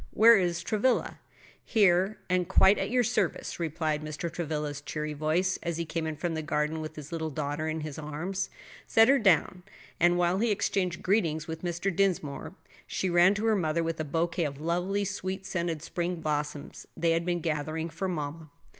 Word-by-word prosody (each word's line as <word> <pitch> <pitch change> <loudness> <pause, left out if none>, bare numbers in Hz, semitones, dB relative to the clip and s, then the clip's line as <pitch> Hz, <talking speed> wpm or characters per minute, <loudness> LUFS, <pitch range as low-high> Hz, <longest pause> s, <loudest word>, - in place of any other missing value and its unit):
Where 230 +2 +7
is 175 -4 0
Travilla?" 225 +4 0 0.4
"Here, 195 -2 +3
and 180 -1 +1
quite 190 +1 +5
at - - -1
your 250 +1 +3
service," 215 -8 -1
replied 155 -2 -1
Mr. 155 +2 -4
Travilla's 150 -3 -3
cheery 150 +1 -4
voice, 155 +5 0
as 170 -1 -3
he 170 - -2
came 160 0 -3
in 155 - -3
from 165 +3 -2
the 160 - -2
garden 150 +1 -1
with 155 0 -7
his 150 0 -9
little 160 -1 -2
daughter 150 +1 -3
in 160 0 -3
his 155 -1 -6
arms. 160 +6 -3 0.4
He - - -16
set 225 +2 +7
her 275 0 +5
down, 185 -3 +3 0.4
and 175 +1 +4
while 175 +2 +2
he 235 +2 +2
exchanged 190 -3 0
greetings 165 -6 +1
with 160 0 -5
Mr. 175 +1 -2
Dinsmore, 170 -4 -1 0.3
she 185 - -1
ran 175 +3 +5
to 210 +2 -2
her 220 -1 +4
mother 165 -3 0
with 165 0 -3
a - - 0
bouquet 165 +3 -1
of 140 -1 -5
lovely 180 +5 0
sweet 190 0 -4
scented 170 -4 -2
spring 175 +1 -2
blossoms 150 -1 -3
they 165 0 +2
had 165 +1 +1
been 175 0 0
gathering 160 0 -2
"for 190 - -3
mamma." 155 -2 -4
170 Hz, 190 wpm, -29 LUFS, 155-190 Hz, 0.4 s, Where